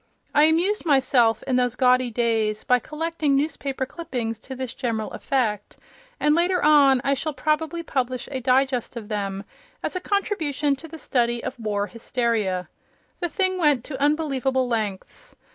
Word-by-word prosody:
I 295 0 +6
amused 345 +7 +2
myself, 260 -6 +3
in 255 -2 0
those 245 -2 +1
gaudy 255 -1 +3
days, 225 -2 0
by 250 0 +3
collecting 310 +1 -1
newspaper 275 -2 -1
clippings 245 -8 -4
to 265 +3 -8
this 255 -1 -5
general 225 -4 -3
effect, 220 -7 -2 0.4
and 300 0 +3
later 355 +2 +2
on 280 -4 +6
I 275 - +2
shall 290 +2 -3
probably 310 +4 -1
publish 255 -4 -2
a 265 - -2
digest 255 0 +1
of 225 -2 -7
them, 200 -2 -3 0.4
as - - -3
a - - 0
contribution 315 -9 0
to 325 - -11
the 325 +1 -9
study 240 -5 0
of 255 - -5
war 205 -2 -1
hysteria. 220 -5 -1 0.5
The 345 - -2
thing 375 +2 0
went 295 -7 +3
to 270 -1 -7
unbelievable 275 -4 +1
lengths. 225 - -4
260 Hz, 160 wpm, -24 LUFS, 235-305 Hz, 0.5 s, I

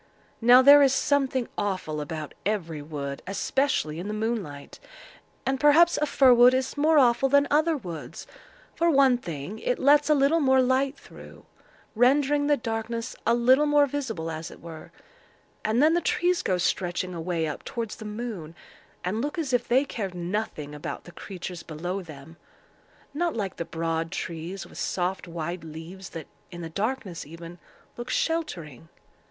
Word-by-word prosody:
Now 245 +3 +7
there 285 +2 +9
is 270 -2 +5
something 270 -4 +1
awful 185 -7 -2
about 150 0 -6
every 170 -7 -2
wood, 140 -2 -6
especially 195 - 0
in 180 - -5
the 210 - -3
moonlight; 210 -11 -4 0.7
and 265 0 0
perhaps 315 +4 +5
a 300 - +2
fir 265 -3 +5
wood 245 +1 +6
is 260 0 -2
more 310 +2 +3
awful 260 0 +4
than 285 +1 +4
other 310 +2 +3
woods. 175 - -8 0.5
For 340 0 +1
one 270 -5 +4
thing, 170 - -6
it 250 - -1
lets 290 +2 +4
a 300 - +5
little 285 +4 +3
more 265 -3 +4
light 260 +2 +1
through, - - -14 0.5
rendering 285 +4 +3
the 295 -1 +3
darkness 230 0 -4
a 230 - +4
little 260 +5 +4
more 290 0 +5
visible, 240 - -4
as 160 0 -6
it - - -13
were; 165 -2 -10 0.7
and 225 +5 +2
then 315 +2 +5
the 345 - +2
trees 360 -5 +1
go 185 - 0
stretching 180 0 -1
away 165 -1 -2
up 150 - -5
towards 230 -3 -5
the - - -9
moon, 210 -7 -6 0.5
and 210 +5 -1
look 295 +5 -3
as 295 -6 -2
if 245 - +1
they 260 +4 +3
cared 195 -9 -5
nothing 175 -5 -4
about 150 - -6
the 175 - -12
creatures 180 -2 -7
below 175 +5 -5
them—not 170 - -8
like 200 -5 -3
the 170 - -3
broad 165 0 -2
trees 175 0 -5
with - - -12
soft 185 0 -2
wide 170 0 -5
leaves 165 +4 -9
that, 165 -3 -8 0.2
in 175 -2 -9
the 165 - -6
darkness 210 -2 -3
even, 165 +3 -11 0.4
look 240 0 -6
sheltering. 170 - -3
220 Hz, 165 wpm, -26 LUFS, 170-270 Hz, 0.7 s, there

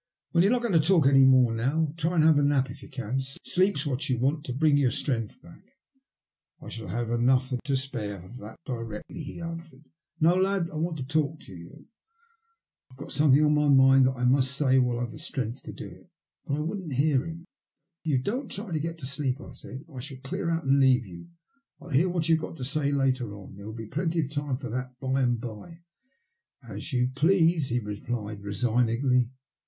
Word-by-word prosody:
"Well 170 0 +5
you're 200 - +4
not 245 -1 +1
going 235 -5 0
to 165 - +6
talk 160 -1 +3
any 135 -1 +6
more 130 -3 +5
now. 145 +7 0
Try 165 +2 -1
and 160 - +4
have 155 -2 +5
a - - +2
nap 140 -2 +2
if - - -11
you - - -12
can. 130 -1 -3
Sleep's 145 +5 0
what 140 -1 -2
you 125 - +1
want 140 +5 0
to - - -4
bring 150 +2 +3
your 140 -3 +3
strength 115 -3 -3
back." 170 0 -15 0.5
" - - -60
I - - -10
shall 115 - -7
have 120 0 -3
enough 125 +2 +2
and 125 - -1
to 140 -2 +1
spare 115 -7 -4
of 120 +7 -11
that 110 -1 -10
directly," 115 +1 -6
he 150 +3 -8
answered. 165 -4 -8 0.2
" 150 +3 -45
No, 165 +2 +5
lad, 190 -1 +1
I 155 - -6
want 165 +1 -2
to 130 - -4
talk 155 +1 0
to 100 - -13
you. 85 0 -13 1.0
I've 130 - -18
got - - -9
something 150 0 +5
on 150 - +3
my 150 0 +2
mind 135 -1 +6
that 130 - 0
I 125 -1 -2
must 130 +1 +3
say 130 -3 +4
while 125 -2 +1
I've 120 -1 -3
the - - -9
strength 130 -7 -4
to - - -6
do - - -8
it." - - -15 0.4
But 140 - -1
I - - -3
wouldn't 170 -1 -4
hear 140 0 +2
him. 165 +1 -8 0.3
" 165 +4 -58
If 160 - -3
you 135 - +3
don't 250 - -2
try 200 0 -6
to 155 - 0
get 165 +2 -4
to 145 - -8
sleep," 140 -1 -2
I - - -10
said, 135 +4 -10
" 155 - -16
I - - -5
shall 135 +1 -8
clear 180 +5 -3
out 165 0 -1
and 135 +1 +4
leave 130 -3 +4
you. 90 - -11 0.5
I'll - - -12
hear 155 +6 +3
what 170 -2 -1
you've 160 -1 +3
got - - -6
to 130 - -5
say 140 +1 0
later 130 -6 0
on. 100 -2 -11
There 100 +1 -10
will 110 - -6
be 115 -1 -6
plenty 165 - -1
of 140 -2 -4
time 145 -3 -2
for 125 -4 -7
that 125 +1 -5
by 130 0 0
and 120 -2 +1
bye." 125 +9 -9 0.8
"As - - -7
you 125 -1 +1
please," 165 0 +3
he 120 - 0
replied 105 0 -5
resignedly. 120 +4 +1
135 Hz, 235 wpm, -27 LUFS, 125-160 Hz, 1.0 s, to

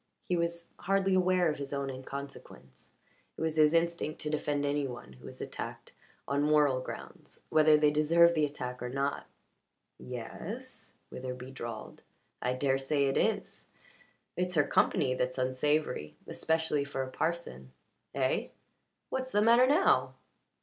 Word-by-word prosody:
He 180 - -1
was 170 0 -2
hardly 195 +1 +1
aware 185 -1 +3
of 150 - -6
his 140 -1 -5
own 140 -1 -2
inconsequence. 135 - -9 0.5
It - - -7
was 160 -1 -1
his 155 -1 +6
instinct 170 -2 0
to 150 - -3
defend 145 -1 -1
any 145 0 0
one 120 - -9
who 65 - -15
was - - -10
attacked - - -7 0.3
on 140 +1 +1
moral 145 -3 +3
grounds, - - -9
whether 155 -1 +6
they 150 -1 +4
deserved 165 +3 +5
the 155 -2 +1
attack 125 -4 -3
or 125 - -3
not. 140 +2 -2 0.7
"Ye 125 0 -6
es," 235 - -8 0.2
Witherbee 125 0 -6
drawled. 115 -4 -7 0.4
"I 125 - 0
dare 135 +1 +1
say 140 +1 +1
it 135 - 0
is. - - -1 0.7
It's 180 0 -1
her 150 - +5
company 130 -2 +2
that's 130 0 -2
unsavoury. 130 - 0
Especially 160 -2 0
for 140 -1 -3
a 130 - -7
parson. 160 - -3 0.4
Eh? - - +1 0.6
What's 260 0 -3
the 205 +1 +3
matter 235 +3 +6
now?" 305 +8 +3
145 Hz, 150 wpm, -31 LUFS, 130-170 Hz, 0.7 s, his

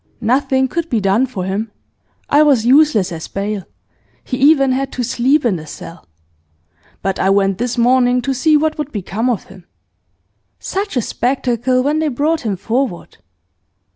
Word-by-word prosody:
Nothing 265 +3 +1
could 335 +4 -3
be 230 - +1
done 200 +6 +2
for 200 -7 -5
him; 200 +4 -3 0.6
I 290 - +4
was 275 -7 +3
useless 255 - +4
as 160 -2 -6
bail; 200 -1 -4 0.6
he 265 +2 +3
e'en 275 -4 +2
had 270 +1 -1
to 250 - -2
sleep 255 +5 +1
in 205 -7 +1
the 155 -1 -10
cell. 165 +3 -11 1.0
But 195 -1 -1
I 190 - +2
went 195 -1 +2
this 245 0 -2
morning 245 +1 +3
to 270 - -1
see 305 +4 +3
what 310 +1 -1
would 300 -1 -4
become 215 +4 -2
of 235 -6 -1
him. 185 -2 -16 0.9
Such 395 -6 -4
a 240 - +1
spectacle 255 +1 0
when 295 +3 0
they 315 - 0
brought 300 +4 0
him 210 -4 -2
forward! 225 0 -3
245 Hz, 170 wpm, -17 LUFS, 205-275 Hz, 1.0 s, I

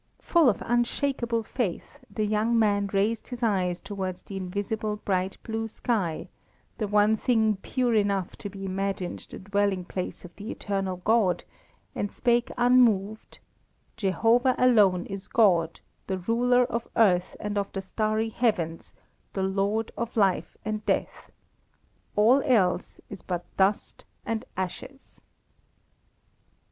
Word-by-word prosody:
Full 335 -6 +4
of 210 - -1
unshakable 240 0 0
faith, 215 -7 -4
the 215 - -2
young 215 +3 +1
man 205 -2 +2
raised 210 +3 0
his 245 -1 -6
eyes 185 -5 +1
towards 190 -3 -5
the 195 - -9
invisible 205 +3 -3
bright 190 -2 -2
blue 225 0 -3
sky, 205 -8 -2 0.5
the 215 - -1
one 210 +1 +4
thing 220 -3 +2
pure 245 +4 -1
enough 200 -4 +1
to 205 - -6
be 195 0 -8
imagined 195 -1 -3
the - - -8
dwelling 200 -1 0
place 185 0 -5
of 175 - -13
the 210 +4 -8
eternal 195 -2 -3
God, 215 -5 +3 0.5
and 205 - -3
spake 240 0 +1
unmoved: 230 -4 +3 0.6
"Jehovah 230 +5 +2
alone 205 -8 +4
is 195 -1 -7
God, 175 -7 +3 0.3
the 190 - -1
Ruler 245 +6 +2
of 235 -1 -3
earth 185 -5 +3
and 210 -1 -3
of 200 -1 -1
the 195 - -4
starry 215 +3 -1
heavens, 190 -9 -1 0.4
the 190 - -1
Lord 200 +3 0
of 235 +1 -4
life 195 -3 +1
and 215 0 -3
death. - - -2 0.9
All 235 +7 +5
else 195 -9 +1
is 195 - -8
but 175 -1 -4
dust 195 +2 0 0.2
and 225 -1 -2
ashes." 190 +9 -6
210 Hz, 135 wpm, -27 LUFS, 190-230 Hz, 0.9 s, All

